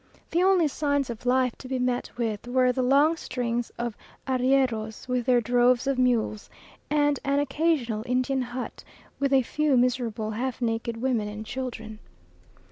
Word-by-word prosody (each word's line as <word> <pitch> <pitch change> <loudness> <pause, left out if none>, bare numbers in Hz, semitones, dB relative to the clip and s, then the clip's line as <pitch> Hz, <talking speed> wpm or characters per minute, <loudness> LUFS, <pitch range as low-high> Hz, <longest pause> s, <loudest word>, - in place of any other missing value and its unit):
The 345 - +2
only 370 -3 +4
signs 285 -3 -1
of 235 +2 -8
life 255 -1 +2
to 260 - -9
be 260 0 -2
met 250 -1 -1
with 225 -2 -2
were 255 0 +3
the 255 - -1
long 280 +6 +4
strings 240 -4 -2
of 235 -2 -3 0.3
arrieros 255 -4 0
with 250 -1 -1
their 245 -1 +4
droves 245 +2 +3
of 270 -1 0
mules, 235 -4 +1 0.4
and 290 -1 +2
an 280 0 +1
occasional 285 -6 0
Indian 255 +2 +1
hut, 250 +1 -6 0.4
with 275 -1 +1
a 265 -1 +4
few 300 +1 +1
miserable 235 -3 0
half 250 +4 -3
naked 230 -1 -2
women 235 -3 0
and 210 +1 -7
children. 230 -4 -6
250 Hz, 160 wpm, -26 LUFS, 235-270 Hz, 0.4 s, only